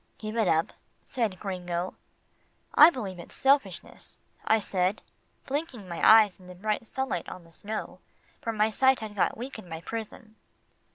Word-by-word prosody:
"Give 215 0 -6
it 225 -4 +2
up," 160 -1 +2 0.3
said 220 -8 -2
Gringo. 180 -2 -3 0.8
"I 305 - +10
believe 200 - -6
it's 170 - -11
selfishness," 275 +1 0 0.3
I 220 - +4
said, 190 -1 0 0.4
blinking 275 - -4
my 170 -1 -5
eyes 215 -3 +7
in 180 - -15
the 180 - -10
bright 215 +4 -2
sunlight 265 -10 -3
on 185 - -9
the 165 - -19
snow, 215 +6 -6 0.4
for 230 -5 -2
my 215 0 +1
sight 265 +3 +3
had 215 -1 -6
got 195 - +1
weak 245 0 -6
in 185 - -12
my 160 - -5
prison. 220 +1 -7
215 Hz, 165 wpm, -28 LUFS, 185-230 Hz, 0.8 s, I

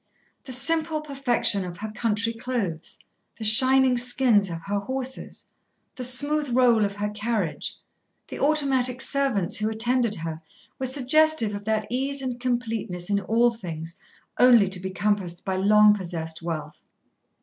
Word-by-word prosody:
The 265 - -7
simple 315 +4 +1
perfection 265 -8 +1
of 175 -1 -8
her 215 +2 -6
country 225 0 -1
clothes, 225 -9 -4 0.4
the 225 - -7
shining 255 +3 +5
skins 240 -5 +3
of 165 -1 -7
her 200 0 -2
horses, 260 +4 -5 0.5
the 255 - -5
smooth 285 +4 +1
roll 240 -4 +4
of 200 0 -5
her 205 0 -3
carriage, 210 -5 -3 0.5
the - - -7
automatic 270 -4 +2
servants 265 -12 +1
who 215 +1 0
attended 235 0 0
her, 160 -2 -6 0.4
were 260 - -1
suggestive 280 -2 +2
of 205 0 -7
that 215 -1 -1
ease 270 +2 -1
and 250 -2 -4
completeness 225 -7 -3
in 200 - +2
all 235 +4 +2
things, 170 -6 -8 0.4
only 240 -5 +6
to 190 -1 -1
be 190 +1 -5
compassed 185 -2 -2
by 190 - -2
long 210 +2 +5
possessed 170 -5 -5
wealth. 165 -2 -6
225 Hz, 150 wpm, -24 LUFS, 200-255 Hz, 0.5 s, only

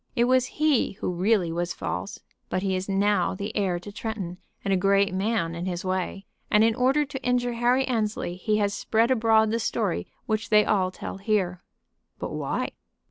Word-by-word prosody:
It 235 - +3
was 255 0 +3
he 305 -4 +2
who 190 - -3
really 180 -1 +2
was 170 0 -2
false. 90 +2 -4 0.3
But 185 - -1
he 190 -1 0
is 185 +1 -3
now 195 -2 +2
the 200 +3 -5
heir 190 -4 +1
to 205 +4 -9
Tretton 200 -5 -5 0.3
and 195 - +2
a - - +4
great 195 +1 +3
man 190 -3 0
in 170 +2 -4
his 180 0 -3
way, 185 +1 -2 0.2
and 210 +1 +5
in 225 0 +4
order 265 +5 +2
to 270 -1 -7
injure 245 -1 +1
Harry 245 +3 +2
Annesley 215 -7 -1
he 210 +3 0
has 205 -1 +1
spread 230 +4 +1
abroad 220 -3 +4
the 230 - 0
story 215 -4 -1 0.2
which 220 +1 -1
they 210 -1 +5
all 190 -3 +2
tell 185 - -7
here." 195 -3 0 0.6
"But - - -5
why?" - - -2
205 Hz, 190 wpm, -26 LUFS, 185-230 Hz, 0.6 s, and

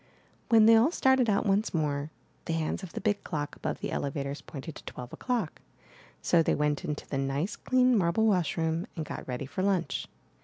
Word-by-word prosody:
When 225 -2 +7
they 225 +1 +8
all 230 +6 +5
started 265 -7 +3
out 200 +2 +2
once 200 0 +1
more, 145 -2 -1 0.4
the 165 - -2
hands 160 +2 -1
of 185 -4 -9
the - - -4
big 205 -2 0
clock 150 -4 -4
above - - -4
the - - -3
elevators 140 0 -3
pointed 150 +2 -8
to - - -12
twelve 125 -1 -8
o'clock; 235 -10 -2 0.6
so 170 - +4
they - - +2
went 150 -1 0
into 150 -1 -4
the 135 - -2
nice, 140 +8 -1
clean, 255 -1 +3
marble 185 +2 +2
wash 180 -9 +2
room 165 +3 0
and 160 -3 -3
got - - -7
ready 125 +1 -3
for 165 +8 -4
lunch. 190 -3 0
170 Hz, 200 wpm, -29 LUFS, 150-215 Hz, 0.6 s, they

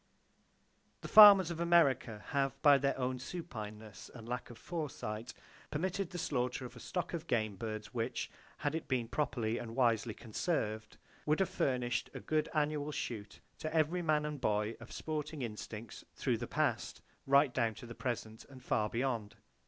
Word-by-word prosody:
The - - -6
farmers 200 -5 +10
of 165 - -5
America 140 -11 +3
have, 135 -1 0
by 145 -2 +8
their 140 0 +1
own 130 -1 -1
supineness 110 - -7
and 115 -2 -11
lack 120 -2 -4
of 120 - -10
foresight, 125 -8 -5 0.4
permitted 185 +4 -1
the 180 - -6
slaughter 125 -5 -1
of 125 - -9
a - - -10
stock 180 -1 -3
of 165 -2 -4
game 110 -4 0
birds 110 0 -5
which, 115 -2 -2 0.3
had 145 - -1
it 160 - -3
been 125 -4 0
properly 120 -4 -1
and 115 -1 -7
wisely 115 -3 +2
conserved, 110 - -2 0.3
would 150 +1 +3
have 190 - +2
furnished 125 -2 0
a - - -4
good 155 -1 0
annual 150 0 0
shoot 110 -7 -5 0.2
to 155 - -3
every 160 +2 +2
farming 165 - -6 0.2
man - - -3
and 150 -3 -4
boy 105 -1 +1
of 120 - -11
sporting 150 -2 -4
instincts 110 -1 -7
through - - 0
the - - -4
past, - - -1 0.2
right 140 -1 +5
down 115 -4 +1
to - - -10
the 120 - -8
present, 110 -3 -4
and 130 -2 -14
far 105 -3 +1
beyond. 115 -3 -2
125 Hz, 175 wpm, -34 LUFS, 115-150 Hz, 0.4 s, farmers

